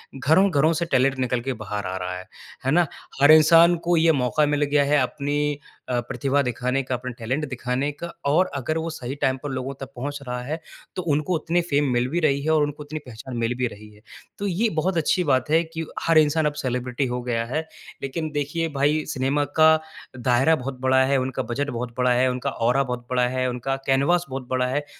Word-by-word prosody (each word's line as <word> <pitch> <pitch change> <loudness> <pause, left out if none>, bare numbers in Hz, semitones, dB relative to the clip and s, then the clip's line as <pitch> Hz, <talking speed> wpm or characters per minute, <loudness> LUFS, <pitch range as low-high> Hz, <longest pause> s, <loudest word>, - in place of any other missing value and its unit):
घरों-घरों 160 +2 +3
से 170 +2 -1
टैलेंट 135 +1 +3
निकल 125 -1 0
के 135 -1 -2
बाहर 105 -2 -5
आ 95 - -3
रहा 90 0 -4
है, 90 - -10 0.4
है 135 - +2
ना। 175 +2 +4 0.4
हर 145 +2 +8
इंसान 165 +2 +7
को 175 - +4
ये 160 0 +5
मौका 140 +2 +1
मिल 145 0 +1
गया 145 0 +3
है 145 +1 +2
अपनी 145 +2 -1 0.3
अ, 120 -1 +1
प्रतिभा 140 0 0
दिखाने 125 +2 -1
का, 130 0 -2
अपने 125 +1 -5
टैलेंट 130 +7 -2
दिखाने 130 +3 -2
का 160 +4 -7 0.2
और 160 +6 +4
अगर 140 +4 -2
वो 160 +1 -2
सही 135 -4 -6
टाइम 135 -2 0
पर 145 - -3
लोगों 130 +1 -4
तक 135 - -7
पहुँच 145 +3 -4
रहा 125 0 -3
है 155 +5 -4 0.4
तो 185 - -2
उनको 150 +5 0
उतनी 170 +2 0
फ़ेम 145 0 +2
मिल 120 +1 +1
भी 170 +5 0
रही 140 -4 +2
है 160 - -1
और 155 -1 +4
उनको 145 0 -4
इतनी 155 +1 -6
पहचान 120 +1 -8
मिल 115 +1 0
भी 125 -1 +1
रही 105 -1 -11
है। 105 - -20 0.4
तो 200 - -2
ये 200 +6 +1
बहुत 180 +2 0
अच्छी 175 +3 +2
बात 130 -2 +1
है 165 +2 +4
कि 160 0 -6 0.2
हर 165 -1 +5
इंसान 155 +1 +4
अब 150 - +1
सेलिब्रिटी 125 +1 -1
हो 125 0 -3
गया 115 -2 -1
है। 155 - +1 0.4
लेकिन 155 +4 -3
देखिए 150 +3 -1
भाई 150 +3 +2
सिनेमा 140 0 0 0.2
का 155 0 +8 0.5
दायरा 130 +6 +3
बहुत 130 -1 -6
बड़ा 130 0 +4
है, 140 0 +2
उनका 130 0 -2
बजट 130 +6 -2
बहुत 120 -2 -4
बड़ा 125 0 +2
है, 125 +1 +3
उनका 125 +2 -2 0.2
औरा 135 +3 +3
बहुत 125 -2 -5
बड़ा 125 -1 +2
है, 130 0 -1
उनका 125 +2 -2
कैनवास 140 +7 +2
बहुत 130 -1 -6
बड़ा 130 -1 +1
है। 145 +3 -2
140 Hz, 225 wpm, -24 LUFS, 125-155 Hz, 0.5 s, हर